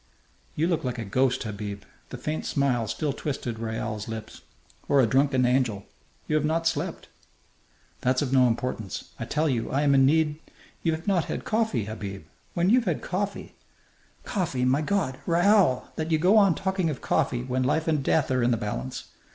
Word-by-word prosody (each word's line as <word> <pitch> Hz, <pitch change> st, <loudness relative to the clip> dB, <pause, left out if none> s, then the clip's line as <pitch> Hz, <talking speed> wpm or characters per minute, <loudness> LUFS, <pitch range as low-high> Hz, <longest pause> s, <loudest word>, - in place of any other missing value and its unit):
"You 155 Hz, -, +1 dB
look 170 Hz, -2 st, 0 dB
like 125 Hz, -1 st, -2 dB
a 115 Hz, -, -4 dB
ghost, 130 Hz, +6 st, +1 dB
Habib." 100 Hz, -2 st, -5 dB, 0.3 s
The 130 Hz, -, -6 dB
faint 155 Hz, +5 st, -3 dB
smile 130 Hz, -5 st, +1 dB
still 135 Hz, +7 st, -2 dB
twisted 125 Hz, -5 st, -4 dB
Raoul's 110 Hz, -2 st, -4 dB
lips. 110 Hz, -1 st, -7 dB, 0.5 s
"Or 140 Hz, -, +5 dB
a 130 Hz, -, +6 dB
drunken 130 Hz, +1 st, +3 dB
angel. 125 Hz, -5 st, +1 dB, 0.4 s
You 155 Hz, -, 0 dB
have 150 Hz, -, 0 dB
not 160 Hz, +2 st, 0 dB
slept." 165 Hz, -, -2 dB, 0.9 s
"That's 130 Hz, +2 st, +1 dB
of 135 Hz, -2 st, -2 dB
no 130 Hz, -2 st, +6 dB
importance. 115 Hz, -4 st, -3 dB
I -, -, -3 dB
tell 155 Hz, +2 st, 0 dB
you 120 Hz, -5 st, -1 dB
I 140 Hz, +2 st, +1 dB
am 140 Hz, -1 st, +4 dB
in 135 Hz, -1 st, +5 dB
need 155 Hz, 0 st, +2 dB, 0.2 s
" -, -, -27 dB
"You've 160 Hz, 0 st, -1 dB
not 185 Hz, -4 st, +2 dB
had -, -, -5 dB
coffee, 215 Hz, -, 0 dB
Habib. 100 Hz, -4 st, -6 dB, 0.3 s
When 175 Hz, +3 st, +2 dB
you've 245 Hz, 0 st, +4 dB
had 175 Hz, -6 st, -1 dB
coffee 200 Hz, +2 st, -3 dB, 0.4 s
" -, -, -34 dB
"Coffee! 160 Hz, -, 0 dB
My 130 Hz, +4 st, +3 dB
God! 155 Hz, -7 st, -1 dB
Raoul, 175 Hz, -5 st, +3 dB
that 160 Hz, 0 st, -2 dB
you 160 Hz, -, +3 dB
go 180 Hz, +7 st, +4 dB
on 200 Hz, -6 st, +5 dB
talking 190 Hz, -3 st, -1 dB
of 150 Hz, -, -4 dB
coffee 120 Hz, -1 st, 0 dB
when 130 Hz, 0 st, -1 dB
life 155 Hz, +6 st, +1 dB
and 155 Hz, -3 st, +2 dB
death 140 Hz, 0 st, +1 dB
are 130 Hz, -1 st, +2 dB
in 120 Hz, -, +3 dB
the 120 Hz, -, +2 dB
balance! 110 Hz, +5 st, -4 dB
135 Hz, 190 wpm, -26 LUFS, 120-160 Hz, 0.9 s, a